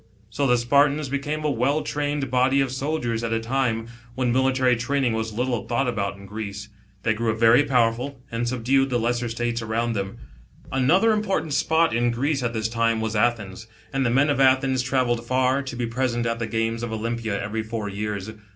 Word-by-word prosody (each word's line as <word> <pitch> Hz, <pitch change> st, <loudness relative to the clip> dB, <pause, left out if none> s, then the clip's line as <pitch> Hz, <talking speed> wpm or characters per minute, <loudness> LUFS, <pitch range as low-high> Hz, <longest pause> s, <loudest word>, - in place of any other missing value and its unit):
So 140 Hz, +5 st, 0 dB
the 125 Hz, -1 st, +4 dB
Spartans 140 Hz, +4 st, +2 dB
became 145 Hz, +3 st, -2 dB
a 150 Hz, -, +2 dB
well 140 Hz, +5 st, +1 dB
trained 145 Hz, -2 st, -2 dB
body 130 Hz, +2 st, +3 dB
of 135 Hz, -2 st, +1 dB
soldiers 130 Hz, -4 st, -2 dB
at 115 Hz, -, -2 dB
a 115 Hz, -, +1 dB
time, 115 Hz, -1 st, -1 dB, 0.3 s
when 125 Hz, -1 st, 0 dB
military 130 Hz, 0 st, +3 dB
training 125 Hz, +1 st, 0 dB
was 110 Hz, 0 st, -2 dB
little 120 Hz, -1 st, -2 dB
thought 120 Hz, +2 st, 0 dB
about 100 Hz, -4 st, -2 dB
in 100 Hz, -, -12 dB
Greece. 105 Hz, 0 st, -6 dB, 0.3 s
They 110 Hz, -, +2 dB
grew 110 Hz, 0 st, -1 dB
very 115 Hz, +4 st, +6 dB
powerful, 125 Hz, +1 st, +1 dB
and 115 Hz, +1 st, -2 dB
subdued 130 Hz, +3 st, +1 dB
the 125 Hz, -, +1 dB
lesser 120 Hz, +1 st, -1 dB
States 120 Hz, 0 st, -2 dB
around 115 Hz, +1 st, -1 dB
them. 95 Hz, -2 st, -4 dB, 0.5 s
Another 175 Hz, -, +3 dB
important 195 Hz, -7 st, 0 dB
spot 160 Hz, +3 st, +2 dB
in 120 Hz, +1 st, +2 dB
Greece 135 Hz, +4 st, 0 dB
at 120 Hz, -1 st, -1 dB
this 110 Hz, -1 st, -1 dB
time 115 Hz, 0 st, +1 dB
was 110 Hz, 0 st, -2 dB
Athens, 105 Hz, -2 st, -1 dB, 0.3 s
and 135 Hz, 0 st, +1 dB
the 125 Hz, -, +2 dB
men 140 Hz, +5 st, +3 dB
of 140 Hz, -, -1 dB
Athens 130 Hz, -1 st, +3 dB
travelled 125 Hz, -2 st, 0 dB
far, 130 Hz, +2 st, +1 dB
to 130 Hz, -3 st, -6 dB
be 120 Hz, 0 st, -2 dB
present 120 Hz, 0 st, -1 dB
at 115 Hz, 0 st, -1 dB
the 115 Hz, -, -2 dB
games 115 Hz, 0 st, -1 dB
of 120 Hz, -1 st, -4 dB
Olympia 110 Hz, -1 st, -2 dB
every 105 Hz, +2 st, -3 dB
four 110 Hz, -1 st, -4 dB
years. 100 Hz, 0 st, -4 dB
120 Hz, 195 wpm, -24 LUFS, 115-135 Hz, 0.5 s, very